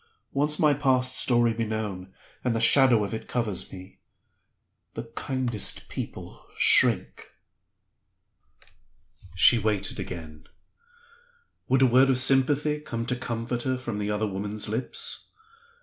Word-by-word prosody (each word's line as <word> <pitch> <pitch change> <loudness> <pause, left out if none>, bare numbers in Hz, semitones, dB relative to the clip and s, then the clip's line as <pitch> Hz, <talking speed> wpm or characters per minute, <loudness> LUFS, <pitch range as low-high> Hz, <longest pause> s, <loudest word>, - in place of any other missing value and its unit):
Once 145 +2 0
let - - -3
my 150 -2 +4
past 130 -2 0
story 120 -2 +2
be 115 +1 -2
known, 105 -4 -5 0.3
and 125 -2 0
the - - 0
shadow 120 -1 +6
of 100 - -5
it 110 - -6
covers 105 -6 -3
me; 95 0 -12 1.0
the 115 - -5
kindest 125 -5 -2
people - - -8
shrink." - - +3 2.1
She 90 +7 +5
waited 105 -2 -2
again. 80 -3 -8 1.2
Would 130 +1 +3
a - - +7
word 130 +2 +4
of 130 - +2
sympathy 140 +3 +2
come 115 -6 -5
to 125 - -1
comfort 120 -1 -4
her 130 +1 -1
from 120 -5 -5
the 105 0 -3
other 105 +1 -1
woman's 105 +2 -5
lips? 115 +4 -4
120 Hz, 135 wpm, -26 LUFS, 105-130 Hz, 2.1 s, a